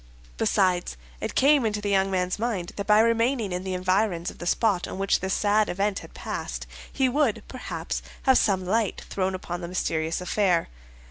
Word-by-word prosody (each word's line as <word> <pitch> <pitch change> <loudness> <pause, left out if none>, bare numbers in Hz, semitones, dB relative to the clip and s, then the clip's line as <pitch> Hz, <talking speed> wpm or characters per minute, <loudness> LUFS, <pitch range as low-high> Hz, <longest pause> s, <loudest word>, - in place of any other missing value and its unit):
Besides, 180 - +1 0.2
it - - -4
came 280 0 +5
into 210 -2 0
the 205 -1 -2
young 195 0 +3
man's 185 0 -1
mind 210 -7 -2
that 200 - -4
by 210 0 +6
remaining 230 -1 +1
in 180 +1 -3
the 190 -1 -3
environs 185 -1 0
of - - -17
the 175 - -5
spot 200 -2 +1
on - - -6
which 195 0 +2
this 190 +1 -1
sad 210 0 +2
event 200 +2 0
had - - -13
passed, - - -5 0.3
he 265 -1 +2
would, 265 -3 +1
perhaps, - - -5 0.2
have 265 -1 +5
some 190 -3 +1
light 215 +2 0
thrown 190 -1 0
upon 175 -1 -5
the 170 - -5
mysterious 165 -2 -1
affair. 180 -1 +1
195 Hz, 190 wpm, -26 LUFS, 180-220 Hz, 0.3 s, by